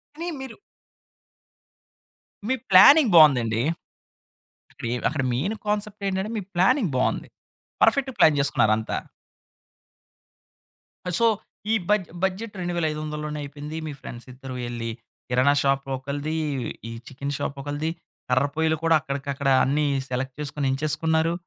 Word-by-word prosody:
అని 335 +3 -5
మీరు 265 -3 -8 1.9
మీ 260 - +2 0.2
ప్లానింగ్ 245 +7 +8
బావుందండి. 125 -8 +6 1.1
అక్కడెం 120 +1 -4
అక్కడ 150 -3 -2
మెయిన్ 170 - -1
కాన్సెప్ట్ 210 0 -2
ఏంటంటే, 190 +2 -2
మీ - - -3
ప్లానింగ్ 185 - +3
బావుంది. 125 - 0 0.5
పర్ఫెక్ట్‌గా 270 -2 +3
ప్లాన్ 150 -2 +5
చేసుకున్నారంతా. 110 -5 +1 2.2
సో, 230 - +4 0.5
ఈ - - +4 0.2
బడ్జె 210 -5 +1
బడ్జెట్ 190 +3 -2
2500ల 155 -4 -2
లోనే 150 0 -4
అయిపోయింది. 145 +2 -7
మీ - - -4
ఫ్రెండ్స్ 120 +1 -9
ఇద్దరు 130 +1 -9
వెళ్లి 120 -1 -4 0.4
కిరాణా 130 +3 +4
షాపు 135 0 0
ఒకళ్ళది. 145 +4 -4 0.5
ఈ - - -7 0.2
చికెను 140 +2 -5
షాపు 140 - -4
ఒకళ్ళది. 145 +3 -3 0.4
కర్రపొయ్యిలు 150 +5 +1
కూడా 165 0 +4
అక్కడికి 140 +1 -5
అక్కడ 135 0 -1
అన్ని 150 +3 +1 0.2
సెలెక్ట్ 130 +1 -3
చేసుకొని 145 -1 -3
ఎంచేసుకున్నారు. 160 +3 0
150 Hz, 115 wpm, -24 LUFS, 135-180 Hz, 2.2 s, ప్లానింగ్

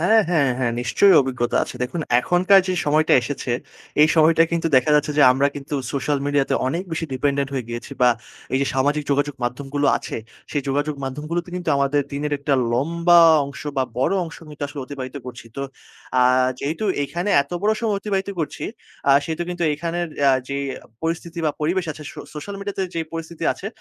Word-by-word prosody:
হ্যাঁ, 220 +6 +5
হ্যাঁ, 145 -6 +3
হ্যাঁ 120 -2 0
নিশ্চয়ই 185 +10 +4
অভিজ্ঞতা 125 -2 -1
আছে। - - -9
দেখুন 145 +7 -3 0.2
এখনকার 185 +6 +5
যেই 185 -1 -1
সময়টা 155 +2 +3
এসেছে, 130 +1 -4 0.5
এই 155 - +6
সময়টা 160 +1 +6
কিন্তু 170 0 0
দেখা 130 +4 +3
যাচ্ছে 150 0 +2
যে - - +7
আমরা 135 +2 +2
কিন্তু 145 +1 -6 0.2
সোশ্যাল 140 +1 0
মিডিয়াতে 145 -1 +1
অনেক 165 +7 -1
বেশি 160 0 -2
dependent 140 +1 0
হয়ে 130 -3 -2
গিয়েছি। 120 0 -6
বা 125 - +7 0.4
এই 130 - +3
যে 140 - +1
সামাজিক 145 +3 +1
যোগাযোগ 145 0 +1
মাধ্যম 125 +3 -3
গুলো 145 0 +2
আছে, - - -6 0.3
সেই 145 - -1
যোগাযোগ 145 +2 0
মাধ্যম 135 +3 -5
গুলোতে 170 +1 -2
কিন্তু 180 -2 -5
আমাদের 140 +1 +2
দিনের 145 +1 -2
একটা 140 0 0 0.2
লম্বা 170 +6 +4 0.3
অংশ 140 - -9
বা 130 - +3 0.2
বড় 130 - +2
অংশ 165 - -9
কিন্তু 150 -1 -5
আসলে 145 0 -7
অতিবাহিত 130 0 -7
করছি। 120 -2 -9
তো 140 - -3 0.6
আ - - +6 0.4
যেহেতু 155 +10 -3 0.2
এখানে 175 +8 -3
এত 140 - -21
বড় 215 +1 +3
সময় 220 -3 0
অতিবাহিত 195 -1 -2
করছি, 155 - -4 0.4
আ - - +7
সেহেতু 160 +1 -3
কিন্তু 175 -1 -3
এইখানের 170 +3 -2
অ্যা 140 -1 +5 0.2
যেই 140 0 -2 0.4
পরিস্থিতি 165 +1 -3
বা - - +3
পরিবেশ 175 +4 0
আছে 150 - -11
সো - - -8
সোশ্যাল 175 +7 -6
মিডিয়া 200 0 -5
তে - - +1
যেই 165 -1 -2
পরিস্থিতি 165 0 -6
আছে, 195 - -9
150 Hz, 195 wpm, -22 LUFS, 140-170 Hz, 0.6 s, যে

